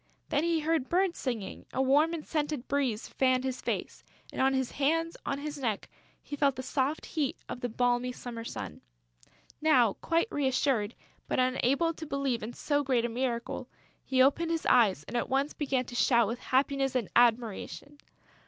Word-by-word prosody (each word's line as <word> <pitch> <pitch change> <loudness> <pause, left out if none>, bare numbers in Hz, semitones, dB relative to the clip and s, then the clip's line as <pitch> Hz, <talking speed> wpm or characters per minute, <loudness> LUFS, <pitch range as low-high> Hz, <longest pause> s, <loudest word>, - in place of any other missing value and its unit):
Then 290 +1 +1
he 335 -1 +1
heard 315 -4 0
birds 365 0 +1
singing; 235 -7 -4
a - - -3
warm 290 +5 +4
and 315 - -7
scented 295 -4 -2
breeze 265 -6 0
fanned 255 -1 +2
his 260 -1 -3
face; - - -3 0.3
and, - - -2
on 265 0 +3
his 260 -2 -1
hands, 330 +4 0
on 275 - 0
his 290 0 -5
neck, 225 -6 -2 0.4
he 290 - -6
felt 280 -2 +2
the 260 - -5
soft 275 +3 -1
heat 295 -5 -2
of 245 - -6
the 245 - -1
balmy 245 +2 +1
summer 240 -2 -7
sun. - - -6 0.8
Now 255 -9 +4
quite 335 +5 +1
reassured, 260 -5 +1 0.3
but - - -1
unable 260 +5 +2
to 320 - -8
believe 275 -4 -1
in 225 +3 -5
so 290 +2 0
great 255 -4 +1
a - - -1
miracle, 240 0 -3 0.3
he 260 -1 +3
opened 325 +5 +2
his 330 -1 -1
eyes 210 - +4
and 245 - -8
at 240 - 0
once 275 +3 +1
began 265 -4 -1
to 245 - -10
shout 235 -2 +4
with 235 +4 -3
happiness 270 0 +1
and 240 -6 0
admiration. 240 +4 +1
265 Hz, 180 wpm, -30 LUFS, 245-290 Hz, 0.8 s, warm